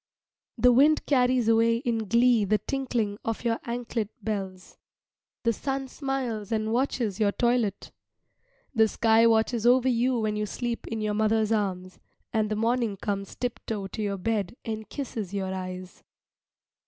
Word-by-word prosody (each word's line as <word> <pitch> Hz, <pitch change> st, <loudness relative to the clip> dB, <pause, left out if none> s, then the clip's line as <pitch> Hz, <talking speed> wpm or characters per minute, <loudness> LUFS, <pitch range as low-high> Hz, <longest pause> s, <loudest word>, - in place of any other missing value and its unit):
The 250 Hz, +2 st, +5 dB
wind 290 Hz, +5 st, +4 dB
carries 250 Hz, -3 st, +2 dB
away 230 Hz, 0 st, +4 dB
in 230 Hz, -3 st, -2 dB
glee 235 Hz, +1 st, +4 dB
the 210 Hz, +2 st, +2 dB
tinkling 230 Hz, -3 st, -2 dB
of 225 Hz, +1 st, -3 dB
your 230 Hz, -1 st, 0 dB
anklet 235 Hz, -3 st, -3 dB
bells. 190 Hz, -3 st, -5 dB, 0.6 s
The 230 Hz, -1 st, +2 dB
sun 270 Hz, +3 st, -3 dB
smiles 255 Hz, -8 st, -3 dB
and 220 Hz, 0 st, 0 dB
watches 240 Hz, -5 st, 0 dB
your 205 Hz, -2 st, +3 dB
toilet. 235 Hz, -3 st, 0 dB, 0.8 s
The 220 Hz, -3 st, +4 dB
sky 225 Hz, +1 st, +4 dB
watches 225 Hz, +1 st, +2 dB
over 255 Hz, +1 st, +5 dB
you 250 Hz, +1 st, +2 dB
when 215 Hz, -1 st, -1 dB
you 210 Hz, 0 st, -2 dB
sleep 240 Hz, +3 st, -4 dB
in 225 Hz, -1 st, -3 dB
your 210 Hz, -1 st, 0 dB
mother's 220 Hz, 0 st, +1 dB
arms, 185 Hz, -4 st, -2 dB, 0.3 s
and 215 Hz, -2 st, +1 dB
the 215 Hz, -, -1 dB
morning 230 Hz, -1 st, 0 dB
comes 200 Hz, -1 st, -4 dB
tiptoe 225 Hz, -4 st, -4 dB
to 220 Hz, -, -5 dB
your 200 Hz, -1 st, -1 dB
bed 205 Hz, 0 st, -2 dB
and 220 Hz, -2 st, -5 dB
kisses 220 Hz, -8 st, -5 dB
your 190 Hz, -1 st, -2 dB
eyes. 185 Hz, 0 st, -7 dB
225 Hz, 155 wpm, -27 LUFS, 210-240 Hz, 0.8 s, The